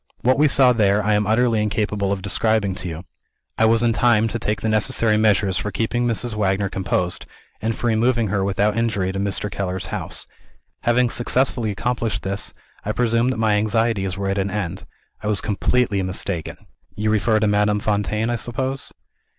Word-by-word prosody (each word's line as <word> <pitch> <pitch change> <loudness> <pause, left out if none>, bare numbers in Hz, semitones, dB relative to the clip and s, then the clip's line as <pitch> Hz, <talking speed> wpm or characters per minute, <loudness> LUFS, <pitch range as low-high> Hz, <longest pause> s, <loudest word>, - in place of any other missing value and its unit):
What 130 +3 +2
we 150 - +5
saw 130 -2 +5
there, 105 -2 +2
I 105 +1 +2
am 105 -1 +1
utterly 115 0 +2
incapable 105 -1 -1
of 95 -2 -2
describing 100 0 +1
to 90 - -5
you. 80 0 -6 0.6
I 110 - +5
was 115 +1 +3
in 115 -1 +3
time 115 -1 +3
to 115 - -3
take 105 -1 -2
the - - -1
necessary 110 0 +3
measures 105 -3 +2
for 105 - -3
keeping 120 +4 -1
Mrs. 120 0 -1
Wagner 100 -1 0
composed, 90 -2 -2 0.3
and 115 +1 -1
for - - -5
removing 115 -1 +2
her 100 0 0
without 100 +2 +1
injury 110 -5 0
to 95 - -4
Mr. 100 +1 -1
Keller's 95 -2 -3
house. - - -4 0.5
Having 120 +1 +2
successfully 120 -1 +1
accomplished 115 0 -2
this, 100 +1 -3 0.3
I 105 - -2
presumed 120 +1 +1
that - - -6
my 110 -1 +2
anxieties 110 -3 0
were 100 0 -2
at 100 +1 0
an 100 +1 -1
end. 95 -2 -4 0.3
I 105 - -4
was 105 -2 +1
completely 105 0 0
mistaken." 95 -2 -3 0.4
"You 105 +1 0
refer 110 +1 +2
to 110 - +1
Madame 105 0 +2
Fontaine, 105 +2 -1
I 120 - 0
suppose?" 130 +4 -3
105 Hz, 185 wpm, -21 LUFS, 100-115 Hz, 0.6 s, we